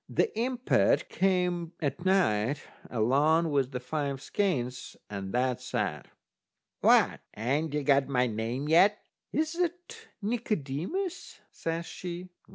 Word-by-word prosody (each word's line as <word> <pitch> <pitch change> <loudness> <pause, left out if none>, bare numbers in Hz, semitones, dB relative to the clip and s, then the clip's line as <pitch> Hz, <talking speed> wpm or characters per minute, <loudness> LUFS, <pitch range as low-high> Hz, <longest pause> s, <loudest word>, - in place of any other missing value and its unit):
The 450 - +1
impet 250 +2 +2
came 180 -3 +1
at 145 +2 -2
night 145 - +2 0.3
along 145 +8 +3
with 135 -2 +1
the 125 - -3
five 140 +1 -2
skeins, 130 -8 -2
and 100 -1 -4
that 125 +1 0
said: - - -3 0.7
"What, - - +5 0.2
ain't 140 +7 0
you 150 - 0
got 140 -1 +4
my 125 -2 +2
name 115 +5 -2
yet?" 190 +7 +5 0.3
"Is 315 +1 0
that 355 +6 -3
Nicodemus?" 220 - -3
says 165 +1 -3
she. 180 +1 -6
160 Hz, 120 wpm, -29 LUFS, 130-195 Hz, 0.7 s, What